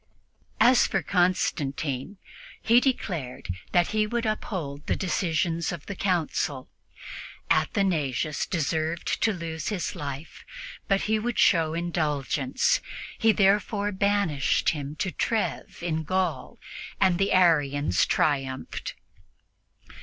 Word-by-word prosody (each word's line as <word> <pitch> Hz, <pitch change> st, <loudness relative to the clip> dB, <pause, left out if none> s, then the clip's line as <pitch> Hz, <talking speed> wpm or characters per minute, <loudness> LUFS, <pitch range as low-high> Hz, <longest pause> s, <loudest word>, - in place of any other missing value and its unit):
As 240 Hz, +2 st, +6 dB
for -, -, -1 dB
Constantine, 155 Hz, -3 st, 0 dB, 0.4 s
he 230 Hz, +2 st, +5 dB
declared 175 Hz, -, -2 dB, 0.2 s
that 175 Hz, -1 st, +3 dB
he 215 Hz, 0 st, +1 dB
would 235 Hz, +1 st, -2 dB
uphold 170 Hz, -9 st, -4 dB
the -, -, +1 dB
decisions 170 Hz, -3 st, -1 dB
of 170 Hz, -4 st, -7 dB
the 200 Hz, -, -5 dB
Council. 165 Hz, -8 st, -1 dB, 0.8 s
Athanasius 155 Hz, -7 st, +1 dB
deserved 160 Hz, 0 st, -1 dB
to 225 Hz, -, +3 dB
lose 165 Hz, -5 st, -5 dB
his 195 Hz, -6 st, -2 dB
life, 140 Hz, +2 st, -7 dB, 0.4 s
but 195 Hz, 0 st, +2 dB
he 220 Hz, 0 st, +1 dB
would 240 Hz, +1 st, -3 dB
show 160 Hz, -1 st, +3 dB
indulgence. 150 Hz, -5 st, 0 dB, 0.4 s
He 225 Hz, -1 st, +5 dB
therefore 205 Hz, 0 st, +2 dB
banished 200 Hz, -7 st, +1 dB
him 145 Hz, -1 st, -4 dB
to 190 Hz, +4 st, -2 dB
Treves 220 Hz, -5 st, -2 dB
in 160 Hz, -2 st, -1 dB
Gaul, 185 Hz, +3 st, -2 dB, 0.4 s
and 190 Hz, -3 st, +3 dB
the 195 Hz, -, +1 dB
Arians 145 Hz, -, +3 dB
triumphed. 135 Hz, -3 st, -1 dB
170 Hz, 110 wpm, -26 LUFS, 150-200 Hz, 0.8 s, As